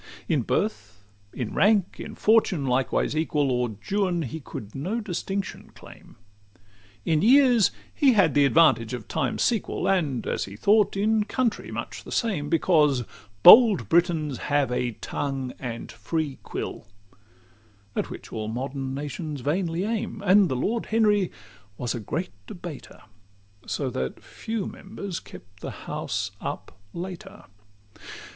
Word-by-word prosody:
XX - - -16
In - - +2
birth, 110 - -2 0.3
in 120 -4 -5
rank, 200 -2 +2
in - - -7
fortune 210 -9 +3
likewise 130 +3 0
equal, 150 -3 +1
O'er 125 -3 -1 0.2
Juan 185 -4 +1
he 155 +4 -5
could 110 -7 -9
no 185 +12 -2
distinction 195 -1 -4
claim; - - -15 0.9
In 155 -2 +2
years 245 -2 +6 0.2
he 275 -3 +4
had 185 - +4
the 145 - +4
advantage 135 -6 +4
of 120 - -9
time's - - -1
sequel; 230 -3 0
And, 155 -10 +1
as - - -1
he 100 - -10
thought, 205 - +3
in 215 +1 +2
country 235 +1 -1
much - - -6
the - - -11
same 185 - -1
Because 150 -6 +3 0.4
bold 225 -5 +9
Britons 165 -5 +2
have 145 -3 +2
a 125 -1 -1
tongue 135 +2 -4
and 120 -3 -6
free 145 +5 -3
quill, - - -6 1.1
At - - -1
which - - -9
all 110 -1 -3
modern 130 +3 -4
nations 145 +1 -5
vainly 165 +4 -1
aim; 220 -1 -3
And 195 -1 +5
the 130 - -1
Lord 220 - -1
Henry 210 -4 +2 0.5
was 120 -2 -2
a 120 - -4
great 155 - -4 0.2
debater, 175 - -9 0.6
So - - -2
that 65 0 -4
few 220 -3 -4
members 195 -2 -6
kept 100 0 -14
the - - -6 0.2
house 100 0 -3
up - - -6 0.2
later. 190 +3 -8
165 Hz, 140 wpm, -25 LUFS, 130-200 Hz, 1.1 s, bold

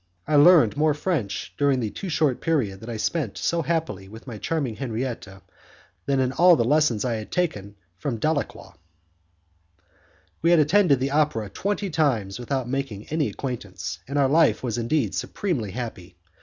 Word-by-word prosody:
I 155 - +1
learned 145 -6 +6
more 150 -1 +3
French 150 - -2
during 140 -2 +3
the 110 -4 -2
too 195 - -6
short 150 -5 +1
period 125 - 0
that 110 - -9
I 115 - -4
spent 135 -1 -2
so 170 0 0
happily 160 - -2
with 110 +2 -12
my 115 -5 -7
charming 140 -8 -2
Henriette 125 -2 -4 0.8
than 140 -1 +2
in 130 -1 +1
all 175 +5 +6
the 120 - +1
lessons 130 -4 +2
I 120 -3 0
had 110 - -8
taken 105 - -2 0.2
from 120 +2 -2
Dalacqua. 155 +3 -2 1.7
We 165 - +3
had 175 - +6
attended 155 -2 +4
the 135 +1 0
opera 140 -9 0
twenty 200 -1 -2
times 120 -10 0
without 130 0 -2
making 125 -6 -4
any 155 -1 0
acquaintance, 95 - -5
and 140 +2 -3
our 140 -2 +4
life 155 +1 +3
was 120 -2 -2
indeed 120 -2 0
supremely 150 - -2
happy. 100 -6 -7
135 Hz, 170 wpm, -24 LUFS, 110-155 Hz, 1.7 s, learned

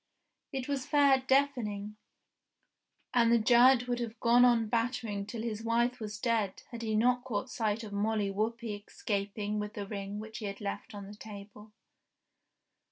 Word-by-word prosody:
It 265 -3 -4
was 280 -2 -2
fair 280 -3 +5
deafening, 250 -7 0 1.2
and 235 -2 +4
the 235 - +6
giant 245 +2 +5
would 245 0 -1
have 230 -1 -5
gone 240 +1 +5
on 235 -3 +4
battering 230 -3 -1
till 225 +1 -5
his 225 -2 -3
wife 240 +2 +1
was 210 -2 -5
dead 220 -5 0
had 235 -1 -6
he 220 -1 -1
not 245 +3 +3
caught 250 0 -3
sight 220 0 -1
of 210 -2 -8
Molly 205 0 0
Whuppie 215 0 -3
escaping 205 0 -2
with 210 +1 -5
the 205 - -4
ring 200 0 -5
which 220 0 -7
he 215 - -5
had 200 0 -5
left 205 +2 -5
on 200 -1 -7
the 200 - -10
table. 210 0 -11
220 Hz, 165 wpm, -31 LUFS, 205-245 Hz, 1.2 s, the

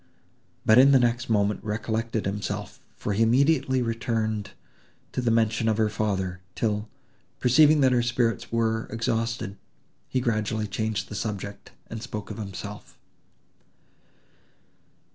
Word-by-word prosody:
but 110 +3 +7
in 140 +2 +7
the 135 - +7
next 120 0 +1
moment 105 -1 +1
recollected 110 +1 -2
himself, 105 +1 -4 0.2
for 105 - -2
he 105 - 0
immediately 130 +2 +3
returned 115 -3 -1 0.6
to - - -2
the 120 - +1
mention 115 0 +2
of 110 - +1
her 110 -1 +2
father; 95 -4 -2
till, 105 -1 -1 0.5
perceiving 150 +4 +5
that 130 -1 +5
her 125 -1 +3
spirits 120 -1 0
were 115 -1 0
exhausted, 115 -2 -2 0.5
he 130 - +1
gradually 110 -3 0
changed 105 0 -2
the - - -8
subject, 100 0 -5
and 110 -1 -7
spoke 110 -3 -6
of 105 - -7
himself. 100 0 -7
110 Hz, 130 wpm, -26 LUFS, 105-120 Hz, 0.6 s, but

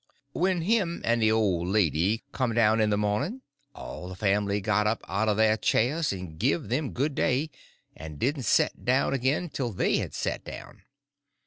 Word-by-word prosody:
When 180 +2 0
him 190 -4 0
and 115 0 +2
the 110 0 +4
old 95 -6 +1
lady 95 - +1
come 125 -4 -1
down 110 -1 +4
in 105 - +2
the 105 - +1
morning 105 - -1 0.3
all 90 - -8
the 95 - -7
family 100 +1 +1
got 105 +1 +1
up 110 +1 -1
out 100 +3 0
of 105 - +1
their 110 0 +4
chairs 145 +10 +1
and 90 -5 -7
give 135 +5 0
them 135 +3 -1
good 140 +4 -1
day, 140 +4 0 0.4
and 80 -2 -9
didn't 135 - -1
set - - +2
down 130 +2 +2
again 140 +7 0
till 125 -5 -3
they 95 - +1
had - - -4
set - - -3
down. - - -10
110 Hz, 185 wpm, -27 LUFS, 105-140 Hz, 0.4 s, the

